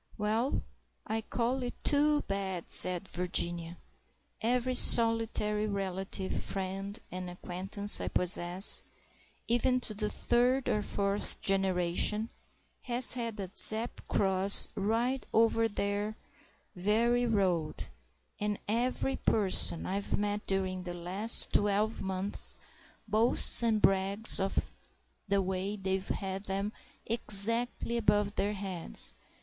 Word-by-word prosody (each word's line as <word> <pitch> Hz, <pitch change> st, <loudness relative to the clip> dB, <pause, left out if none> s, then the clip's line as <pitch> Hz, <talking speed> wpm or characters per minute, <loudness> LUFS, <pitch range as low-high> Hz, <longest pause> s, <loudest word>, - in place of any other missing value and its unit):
"Well, 220 Hz, +5 st, -1 dB, 0.4 s
I 220 Hz, +1 st, -3 dB
call 245 Hz, +3 st, -2 dB
it 245 Hz, -1 st, -5 dB
too 295 Hz, 0 st, +2 dB
bad!" 190 Hz, -3 st, -4 dB
said 180 Hz, +1 st, +3 dB
Virginia. 175 Hz, -1 st, -1 dB, 0.6 s
"Every 250 Hz, +2 st, 0 dB
solitary 225 Hz, -3 st, +4 dB
relative, 195 Hz, -1 st, -4 dB
friend, 195 Hz, +1 st, -5 dB
and 185 Hz, 0 st, -6 dB
acquaintance 190 Hz, +3 st, +1 dB
I -, -, -4 dB
possess, 180 Hz, +1 st, +1 dB, 0.7 s
even 250 Hz, +2 st, +1 dB
to 220 Hz, -, -2 dB
the 210 Hz, 0 st, -3 dB
third 245 Hz, +4 st, 0 dB
and 210 Hz, -, 0 dB
fourth 200 Hz, 0 st, -2 dB
generation, 195 Hz, +3 st, 0 dB, 0.5 s
has 245 Hz, +1 st, +5 dB
had 230 Hz, -3 st, -5 dB
a 190 Hz, -2 st, -6 dB
Zepp 220 Hz, +2 st, +3 dB
cross 195 Hz, 0 st, +5 dB
'right 230 Hz, +6 st, -1 dB
over 225 Hz, 0 st, +3 dB
their 205 Hz, 0 st, -3 dB, 0.6 s
very 230 Hz, +6 st, +1 dB
road'; 185 Hz, -8 st, -1 dB, 0.5 s
and 210 Hz, -1 st, -2 dB
every 245 Hz, +4 st, -1 dB
person 190 Hz, -5 st, 0 dB
I've 200 Hz, +2 st, -2 dB
met 205 Hz, 0 st, -3 dB
during 190 Hz, -1 st, -2 dB
the 175 Hz, -1 st, -7 dB
last 190 Hz, +6 st, +2 dB
twelve 210 Hz, +2 st, 0 dB
months 190 Hz, +1 st, -5 dB, 0.5 s
boasts 220 Hz, +4 st, +4 dB
and 225 Hz, -2 st, +1 dB
brags 195 Hz, +3 st, +3 dB
of 195 Hz, 0 st, -2 dB, 0.6 s
the 200 Hz, 0 st, +1 dB
way 190 Hz, +2 st, -3 dB
they've 190 Hz, -1 st, -3 dB
had 195 Hz, 0 st, -4 dB
them 195 Hz, +2 st, -3 dB, 0.3 s
'exactly 230 Hz, +2 st, 0 dB
above 205 Hz, -3 st, +1 dB
their 205 Hz, 0 st, -2 dB
heads. 190 Hz, -4 st, -1 dB
205 Hz, 115 wpm, -30 LUFS, 190-225 Hz, 0.7 s, has